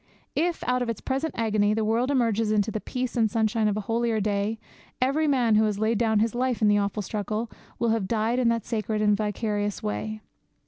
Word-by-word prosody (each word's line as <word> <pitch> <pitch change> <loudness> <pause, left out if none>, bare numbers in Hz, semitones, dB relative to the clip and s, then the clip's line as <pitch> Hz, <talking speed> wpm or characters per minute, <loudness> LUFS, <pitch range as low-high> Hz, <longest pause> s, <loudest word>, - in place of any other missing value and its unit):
If, 340 +1 0
out 250 0 +1
of 245 - -1
its 230 - -3
present 275 +3 -2
agony, 215 -2 +2
the 220 -1 0
world 230 +4 +1
emerges 230 -5 +1
into 215 0 +1
the 215 - -3
peace 255 -1 -3
and 225 -3 +3
sunshine 220 0 +1
of 210 0 0
a - - -1
holier 225 +1 0
day, 205 +1 -1 0.4
every 275 +5 +2
man 250 -6 +3
who 215 0 +4
laid 220 +2 0
down 220 -2 +2
his 220 +1 +1
life 250 0 0
in 215 - +3
the 205 0 +4
awful 200 +1 -1
struggle 215 +3 -3 0.3
will 235 - +1
have 220 -4 0
died 230 +3 0
in 245 -2 +3
that 230 -2 -1
sacred 220 -2 -2
and 210 -1 +4
vicarious 210 -1 -2
way. 105 +1 -3
220 Hz, 215 wpm, -26 LUFS, 210-235 Hz, 0.4 s, who